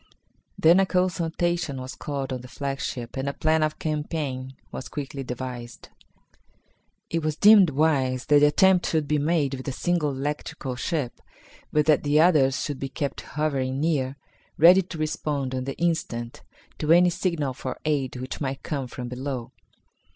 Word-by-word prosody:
Then 170 Hz, +4 st, +6 dB
a 195 Hz, -, +3 dB
consultation 175 Hz, -4 st, 0 dB
was 130 Hz, 0 st, -6 dB
called 140 Hz, -2 st, -4 dB
on 125 Hz, -, -4 dB
the 125 Hz, -, -11 dB
flagship 135 Hz, -3 st, -4 dB
and 135 Hz, +1 st, -1 dB
a -, -, -4 dB
plan 155 Hz, +1 st, +1 dB
of 155 Hz, 0 st, 0 dB
campaign 150 Hz, -4 st, -3 dB, 0.2 s
was 130 Hz, -, -7 dB
quickly 140 Hz, -1 st, -5 dB
devised. 125 Hz, -2 st, -7 dB, 1.2 s
It 165 Hz, -, 0 dB
was 155 Hz, -1 st, -1 dB
deemed 205 Hz, -1 st, +7 dB
wise 135 Hz, -4 st, +1 dB
that 145 Hz, -1 st, +5 dB
the 150 Hz, -, +6 dB
attempt 185 Hz, +4 st, +4 dB
should 155 Hz, -3 st, 0 dB
be 150 Hz, 0 st, +1 dB
made 150 Hz, -2 st, +1 dB
with 130 Hz, 0 st, -6 dB
a -, -, 0 dB
single 170 Hz, +2 st, 0 dB
electrical 135 Hz, -1 st, -4 dB
ship, 140 Hz, -1 st, -3 dB, 0.5 s
but 150 Hz, -1 st, +2 dB
that 155 Hz, -2 st, +4 dB
the 145 Hz, +1 st, +2 dB
others 150 Hz, -6 st, +4 dB
should 145 Hz, -3 st, -4 dB
be 135 Hz, -, -4 dB
kept 140 Hz, 0 st, -3 dB, 0.2 s
hovering 135 Hz, -3 st, 0 dB
near, 140 Hz, -4 st, 0 dB, 0.4 s
ready 180 Hz, +4 st, +8 dB
to 175 Hz, -2 st, -8 dB
respond 150 Hz, -3 st, -2 dB
on 130 Hz, 0 st, -3 dB
the 135 Hz, -, -5 dB
instant 155 Hz, -9 st, -2 dB, 0.4 s
to 155 Hz, 0 st, +1 dB
any 175 Hz, +1 st, +6 dB
signal 165 Hz, -7 st, -1 dB
for 130 Hz, 0 st, -5 dB
aid 140 Hz, -5 st, 0 dB
which 130 Hz, +3 st, -6 dB
might 135 Hz, -2 st, -3 dB
come 140 Hz, -4 st, -3 dB
from 125 Hz, 0 st, -7 dB
below. 125 Hz, -1 st, -5 dB
145 Hz, 165 wpm, -25 LUFS, 130-160 Hz, 1.2 s, ready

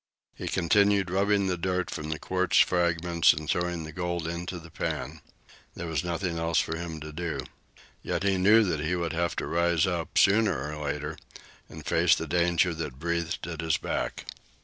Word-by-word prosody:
He -, -, -7 dB
continued 100 Hz, +1 st, +3 dB
rubbing 100 Hz, +1 st, +2 dB
the 90 Hz, -2 st, -1 dB
dirt 90 Hz, 0 st, -1 dB
from 75 Hz, 0 st, -5 dB
the 80 Hz, -, -2 dB
quartz 95 Hz, +2 st, 0 dB
fragments 85 Hz, -1 st, +4 dB
and 75 Hz, +1 st, -6 dB
throwing 85 Hz, 0 st, -1 dB
the 80 Hz, -, -7 dB
gold 85 Hz, 0 st, -3 dB
into 85 Hz, +2 st, -4 dB
the 85 Hz, -1 st, -12 dB
pan. 75 Hz, +2 st, -4 dB, 0.5 s
There 85 Hz, -, -5 dB
was 80 Hz, +1 st, -1 dB
nothing 85 Hz, 0 st, -2 dB
else 85 Hz, -1 st, 0 dB
for 80 Hz, -, -1 dB
him 80 Hz, -1 st, -5 dB
to 75 Hz, +1 st, -8 dB
do. 80 Hz, -4 st, -3 dB, 0.6 s
Yet 90 Hz, +1 st, -2 dB
he 95 Hz, -2 st, +2 dB
knew 110 Hz, +4 st, +6 dB
that 85 Hz, -7 st, -1 dB
he 80 Hz, +4 st, -1 dB
would 85 Hz, -2 st, -2 dB
have 85 Hz, +1 st, -1 dB
to -, -, -2 dB
rise 85 Hz, -1 st, +2 dB
up, 85 Hz, -3 st, -2 dB
sooner 95 Hz, -9 st, +3 dB
or 75 Hz, 0 st, -6 dB
later, 75 Hz, 0 st, -3 dB, 0.5 s
and -, -, -10 dB
face -, -, +4 dB
the -, -, -4 dB
danger 85 Hz, 0 st, +2 dB
that 75 Hz, -6 st, -5 dB
breathed 85 Hz, +1 st, -2 dB
at 80 Hz, -2 st, -5 dB
his 80 Hz, -1 st, +1 dB
back. -, -, -3 dB
85 Hz, 190 wpm, -28 LUFS, 80-90 Hz, 0.6 s, knew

